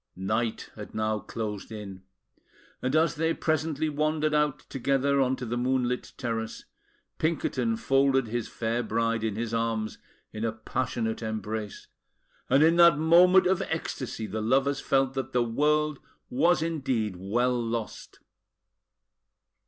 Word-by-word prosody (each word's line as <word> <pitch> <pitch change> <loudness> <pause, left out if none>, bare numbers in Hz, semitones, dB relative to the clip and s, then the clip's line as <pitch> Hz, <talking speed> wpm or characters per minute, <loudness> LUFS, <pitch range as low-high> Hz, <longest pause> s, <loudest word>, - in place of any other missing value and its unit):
Night 110 +5 -2
had 105 -1 -9
now 110 0 0
closed 105 -1 -5
in, 100 -4 -8 0.8
and 130 +3 0
as 160 +1 +3
they 165 +1 0
presently 155 -1 0
wandered 155 +1 0
out 150 -1 +2
together 140 +1 +1
on 130 0 +2
to 125 - -6
the 120 +1 -2
moonlit 125 0 -1
terrace, 115 -2 -4 0.5
Pinkerton 130 -8 0
folded 135 +1 +2
his 115 +1 -3
fair 115 +1 -2
bride 115 0 -1
in 110 -2 -1
his 115 0 -3
arms 115 -1 -1 0.3
in 110 - -5
a 115 - +1
passionate 110 0 -3
embrace; 110 -1 -4 0.6
and 135 +4 +5
in 165 +2 +4
that 170 -3 +7
moment 175 +4 +6
of 190 +1 +2
ecstasy, 130 -8 -4
the 110 +1 -4
lovers 135 +4 +2
felt 135 -2 +1
that 135 -1 -4
the 125 -1 +3
world 150 +5 +1 0.3
was 160 +6 +3
indeed 130 - -1
well 120 +7 0
lost. 115 -1 -5
125 Hz, 135 wpm, -27 LUFS, 110-150 Hz, 0.8 s, that